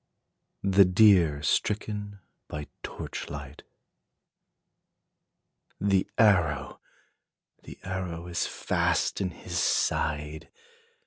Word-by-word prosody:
THE 100 0 +6
DEER 90 -6 +4
STRICKEN 105 +5 -1 0.3
BY 75 0 -6 0.2
TORCH - - -6
LIGHT. 70 0 -8 2.2
The 100 -2 +1
arrow! 80 -11 +2 0.8
the - - -11
arrow 90 -3 -4
is 85 -1 -2
fast - - 0
in 95 - 0
his 90 - -5
side! 75 +1 0
90 Hz, 80 wpm, -28 LUFS, 75-100 Hz, 2.2 s, THE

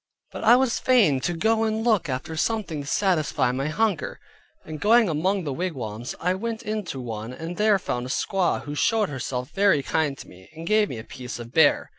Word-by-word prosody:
But - - -7
I 230 +2 +7
was 255 -2 +1
fain 215 - +4
to 175 - -1
go 220 +6 +1
and 220 0 -1
look 215 -9 +2
after 130 +5 -4
something 185 -4 -1
to 140 - -9
satisfy 160 -9 +1
my 135 +3 -2
hunger, 205 +2 -1 0.5
and 155 -1 -7
going 225 +2 +5
among 185 +5 0
the 145 -4 -3
wigwams, 125 - -4
I 180 +2 +1
went 225 +4 -4
into 210 - -4
one 115 -2 -5
and 165 +7 -6
there 210 0 +3
found 125 -8 -3
a - - -9
squaw 185 +6 0
who 145 - -6
showed 215 +7 +1
herself 125 -2 -4
very 195 -8 +3
kind 150 -1 0
to - - -11
me, 95 +1 -16
and 165 +1 -8
gave 215 +2 +3
me 120 - -5
a 110 - -7
piece 125 +1 -8
of 120 0 -9
bear. 160 -3 +4
165 Hz, 210 wpm, -24 LUFS, 135-215 Hz, 0.5 s, I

